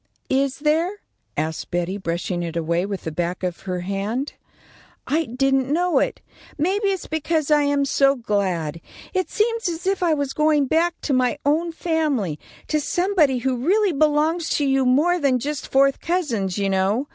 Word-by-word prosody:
"Is 270 0 +1
there?" 315 +5 +1 0.4
asked 160 0 -3
Betty, 175 +2 -1
brushing 175 0 -2
it 170 -1 -4
away 170 +3 0
with 200 -2 -5
the 160 - -4
back 175 +3 -3
of 180 -2 -2
her 180 -1 -2
hand. 200 +9 -3 0.7
"I 320 +3 +1
didn't 270 +2 +1
know 350 +3 +2
it. - - -1 0.4
Maybe 385 +7 +1
it's 385 -2 -1
because 315 -1 -1
I 300 -1 +5
am 285 -1 +2
so 275 0 +3
glad. 185 - -1 0.3
It 370 -1 0
seems 455 -2 0
as 335 +1 -5
if 385 0 0
I 335 -3 +3
was 285 -2 -2
going 305 -2 +3
back 330 +5 +1
to 285 - -1
my 255 +2 +2
own 320 +4 +1
family; 300 - -1 0.3
to 305 -1 0
somebody 350 -4 +2
who 255 +1 -1
really 395 +3 +3
belongs 310 +3 +2
to 290 - +1
you 270 -1 +2
more 320 +8 +3
than 275 -4 +2
just 285 +3 -4
fourth 275 0 +3
cousins, 235 - -1
you 200 -1 0
know. 195 +8 +1
275 Hz, 175 wpm, -22 LUFS, 200-320 Hz, 0.7 s, I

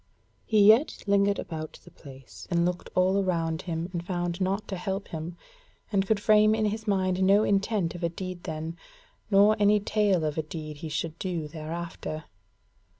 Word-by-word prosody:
He 210 -2 +5
yet 225 +8 +5
lingered 200 0 +3
about 155 -1 -6
the - - -15
place, 135 -2 -13
and 170 -1 +2
looked 180 0 -3
all 190 +2 +3
around 165 -3 -1
him 165 -1 -3
and 170 -1 -3
found 175 0 -3
naught 195 +3 -1
to 195 - -2
help 190 +2 -4
him, 165 +2 -6 0.5
and 195 -2 +1
could 220 0 +2
frame 215 0 +5
in 220 -1 0
his 215 +1 -3
mind 190 -2 +1
no 200 +3 +5
intent 200 -3 +1
of 175 0 -8
a 170 - +2
deed 185 +1 -7
then, 160 +1 -5 0.5
nor 205 +1 +5
any 210 0 +5
tale 205 -5 +1
of 150 +1 -2
a - - +2
deed 155 -1 -7
he 160 +2 -6
should 160 +2 -3
do 175 -5 -3
thereafter. 155 0 -6
185 Hz, 180 wpm, -27 LUFS, 165-200 Hz, 0.5 s, He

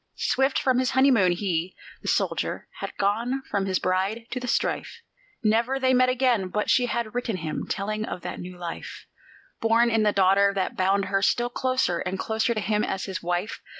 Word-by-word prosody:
Swift 270 +1 +1
from 255 -1 +2
his 255 -1 +1
honeymoon 250 -9 +5
he, 175 -1 -2 0.3
the - - -9
dead - - +3
soldier, - - -2
had - - -6
gone 235 +7 0
from 195 -1 0
his 185 -1 +1
bride 195 +5 -1
to 255 - -2
the 250 - -6
strife; - - -1 0.4
Never 230 +5 +2
they 260 -1 +3
met 255 0 +4
again, 250 -6 +2
but 210 +3 -1
she 250 -1 +3
had 235 -2 -2
written 240 -4 -2
him, 160 -3 -4
telling 215 +2 -2
of 180 - -6
that - - -6
new 180 0 -8
life, 175 -1 -7 0.5
Born 230 +1 +3
in 225 -1 +2
the 210 -1 +3
daughter, 200 +1 +4
that 190 -1 -1
bound 195 +1 +2
her 195 +1 0
still 240 +4 +2
closer 255 -10 0
and 185 +1 -3
closer 220 +3 0
to - - 0
him 210 0 0
as 190 - -2
his 190 -2 -5
wife. 175 +4 -2
215 Hz, 200 wpm, -25 LUFS, 190-245 Hz, 0.5 s, honeymoon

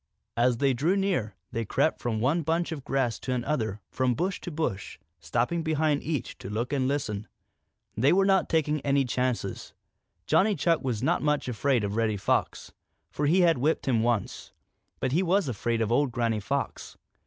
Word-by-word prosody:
As 120 0 +2
they 135 +1 +2
drew 160 +11 +1
near, 180 - -1 0.2
they 115 - -2
crept 140 +8 0
from 115 -3 -1
one 145 +9 +2
bunch 165 +3 -1
of 150 -5 -5
grass 135 -4 -1
to 130 - -3
another 120 -2 -1
and 100 +1 -8
from 130 -2 +1
bush 180 +6 -2
to - - -5
bush, 150 - -3 0.2
stopping 125 - -1
behind 155 -2 +1
each 150 -6 -4
to - - -7
look 115 +6 -2
and 130 -2 +1
listen. 110 -7 -2 0.7
They 130 +6 +3
were 195 +2 +4
not 195 -1 +3
taking 155 -2 +1
any 140 0 +2
chances. 125 -5 -2 0.5
Johnny 205 +1 +3
Chuck 165 -4 +1
was 120 -4 -2
not - - +2
much 150 -2 0
afraid 125 0 +1
of 100 0 -2
Reddy 110 -2 +1
Fox, - - -1 0.4
for 145 - -1
he 180 +5 +4
had 165 -6 +4
whipped 150 +3 0
him 120 -4 +2
once, 115 -3 -1 0.5
but - - -1
he 165 +7 +2
was 190 -1 +2
afraid 120 -1 -1
of 110 - -2
old 135 +2 +2
Granny 115 -3 0
Fox. 140 +7 -4
135 Hz, 190 wpm, -27 LUFS, 115-160 Hz, 0.7 s, were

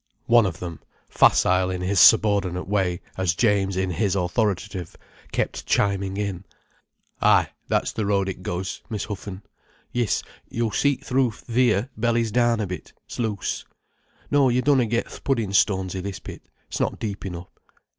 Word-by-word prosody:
One 115 -3 +5
of 85 -3 -4
them, 85 -3 -6 0.3
facile 90 0 +4
in 90 -1 -3
his 95 +1 +1
subordinate 100 -5 +5
way 95 -3 0 0.2
as 95 -4 +1
James 100 -3 +2
in 95 -1 0
his 100 +1 0
authoritative, 95 -1 -1 0.4
kept - - -2
chiming 100 -1 +1
in: 100 -3 -3 0.8
"Ay, - - +4 0.2
that's - - +1
the 105 -2 -2
road 100 -1 +1
it 95 - -5
goes, 90 +1 -4
Miss 105 -2 -3
Huffen—yis, 105 +3 -5 0.3
yo'll 115 -1 -1
see 140 +3 +2
th' - - -14
roof 125 -4 +1
theer 120 0 +2
bellies 115 0 +1
down 120 0 +2
a 105 - 0
bit—s' 90 +5 -9
loose. 110 -4 -2 0.7
No, 140 -2 +4
you 125 +1 +1
dunna 135 -5 +3
get 115 +2 0
th' - - -12
puddin' 115 -8 0
stones 95 -1 +2
i' - - -2
this 100 -1 -5
pit—s' - - -10
not - - 0
deep 105 -3 -5
enough. 90 -1 -7
100 Hz, 155 wpm, -24 LUFS, 95-115 Hz, 0.8 s, One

